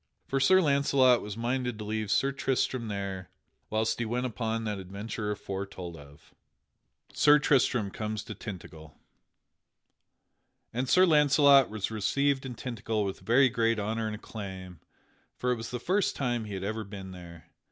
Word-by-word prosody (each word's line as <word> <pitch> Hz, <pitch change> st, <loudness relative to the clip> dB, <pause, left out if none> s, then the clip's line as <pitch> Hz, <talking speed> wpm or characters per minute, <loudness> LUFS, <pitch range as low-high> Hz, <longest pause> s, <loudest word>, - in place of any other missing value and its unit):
For 135 Hz, -, -1 dB
Sir 185 Hz, +8 st, +5 dB
Launcelot 140 Hz, -4 st, +4 dB
was 105 Hz, +1 st, -7 dB
minded 125 Hz, 0 st, -1 dB
to 105 Hz, -, -6 dB
leave 110 Hz, 0 st, -3 dB
Sir 135 Hz, +7 st, +2 dB
Tristram 130 Hz, -3 st, -1 dB
there 100 Hz, -3 st, -4 dB, 0.4 s
whilst 110 Hz, +1 st, 0 dB
he 120 Hz, -, -1 dB
went 120 Hz, +3 st, -1 dB
upon 115 Hz, -1 st, -2 dB
that 105 Hz, -2 st, -3 dB
adventure 100 Hz, +3 st, -5 dB
aforetold 95 Hz, -4 st, -5 dB
of. 70 Hz, -1 st, -14 dB
[Sidenote: -, -, -26 dB, 0.9 s
Sir 150 Hz, 0 st, +7 dB
Tristram 125 Hz, -8 st, +2 dB
comes 110 Hz, 0 st, -4 dB
to -, -, -7 dB
Tintagel] 80 Hz, -7 st, -9 dB, 1.8 s
And 125 Hz, +2 st, -2 dB
Sir 185 Hz, +1 st, +6 dB
Launcelot 145 Hz, -4 st, +5 dB
was 105 Hz, -1 st, -3 dB
received 135 Hz, +6 st, 0 dB
in 125 Hz, -, -7 dB
Tintagel 115 Hz, -4 st, -3 dB
with 95 Hz, -, -4 dB
very 130 Hz, +4 st, +4 dB
great 115 Hz, -1 st, +1 dB
honor 110 Hz, +2 st, -2 dB
and 110 Hz, -, -3 dB
acclaim, 95 Hz, -5 st, -8 dB, 0.6 s
for 125 Hz, -, 0 dB
it -, -, +2 dB
was 115 Hz, -1 st, -6 dB
the 125 Hz, -, -4 dB
first 190 Hz, -, 0 dB
time 120 Hz, -4 st, -1 dB
he 105 Hz, -2 st, -6 dB
had 95 Hz, -, -5 dB
ever 110 Hz, +2 st, -3 dB
been 95 Hz, -2 st, -9 dB
there. 85 Hz, -3 st, -12 dB
110 Hz, 165 wpm, -29 LUFS, 100-130 Hz, 1.8 s, Sir